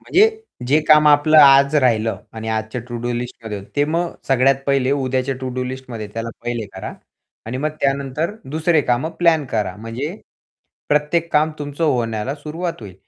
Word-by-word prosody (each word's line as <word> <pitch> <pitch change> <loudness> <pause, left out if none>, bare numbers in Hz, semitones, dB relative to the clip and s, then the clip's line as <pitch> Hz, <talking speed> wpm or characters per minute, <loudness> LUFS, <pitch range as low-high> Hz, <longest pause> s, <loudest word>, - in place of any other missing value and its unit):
म्हणजे 425 +4 +4 0.4
जे 145 +5 +3
काम 150 -1 +7
आपलं 150 +1 +5
आज 140 0 +7
राहिलं 115 -5 +2
आणि 110 0 -6
आजच्या 110 +2 -3
टू-डू-लिस्टमध्ये 120 -3 -4 0.2
ते 145 - +3
मग 165 +3 -1 0.2
सगळ्यात 135 +1 +4
पहिले 135 -1 +2
उद्याच्या 130 -1 -1
टू-डू 130 0 -3
-लिस्टमध्ये 125 -4 -6
त्याला 115 0 -3 0.2
पहिले 120 -2 -3
करा. 95 - -7 0.5
आणि 120 +3 -4
मग 150 +3 -1
त्यानंतर 140 +7 -1 0.2
दुसरे 160 +1 +2
कामं 125 +5 0
प्लॅन 165 -3 +3
करा. 105 -5 -1
म्हणजे 115 - -5 0.7
प्रत्येक 150 +3 +1
काम 155 +1 +3
तुमचं 145 +2 -3
होण्याला 120 -2 -1
सुरुवात 160 +3 -5
होईल. 100 -4 -10
135 Hz, 150 wpm, -20 LUFS, 120-150 Hz, 0.7 s, काम